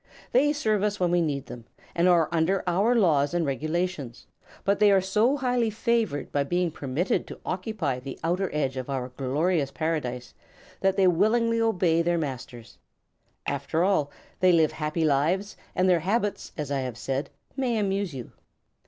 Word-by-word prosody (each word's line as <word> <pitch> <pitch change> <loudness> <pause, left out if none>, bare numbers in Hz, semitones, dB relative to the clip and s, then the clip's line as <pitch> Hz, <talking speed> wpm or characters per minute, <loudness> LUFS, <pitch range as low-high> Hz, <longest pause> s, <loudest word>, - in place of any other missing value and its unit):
They 285 +4 +4
serve 220 -9 0
us 205 0 -1
when 180 -2 +1
we 175 0 +3
need 145 -4 -2
them, 120 -2 -10 0.3
and 170 +1 +2
are 170 -3 +4
under 170 +3 +1
our 195 +7 +2
laws 160 -7 +3
and 170 -2 +1
regulations; 155 -2 -3 0.4
but 200 +1 +1
they 210 -1 +6
are 195 - +5
so 210 +9 +2
highly 250 -4 +1
favored 220 - -1
by 145 - +1
being 175 +4 0
permitted 145 +6 -1
to - - -9
occupy 180 - -2
the 135 +1 -8
outer 180 +3 0
edge 135 -3 -1
of 130 +1 -5
our 130 -2 -3
glorious 140 +4 0
Paradise 135 -5 -3 0.5
that 195 0 +1
they 195 - +4
willingly 230 +6 +3
obey 180 -7 +2
their 170 0 +1
masters. 130 -6 -6 0.7
After 165 +2 -1
all, 185 -7 +2 0.3
they 185 0 +5
live 160 -3 +4
happy 155 +1 -2
lives, 165 +8 +1 0.2
and 185 - +2
their 180 -2 +4
habits, 205 +3 -1
as 150 -3 -4
I 140 - 0
have 125 -3 -4
said, 135 +4 -3 0.3
may 255 -4 0
amuse 200 -2 -1
you. 130 -4 -8
175 Hz, 170 wpm, -26 LUFS, 145-200 Hz, 0.7 s, they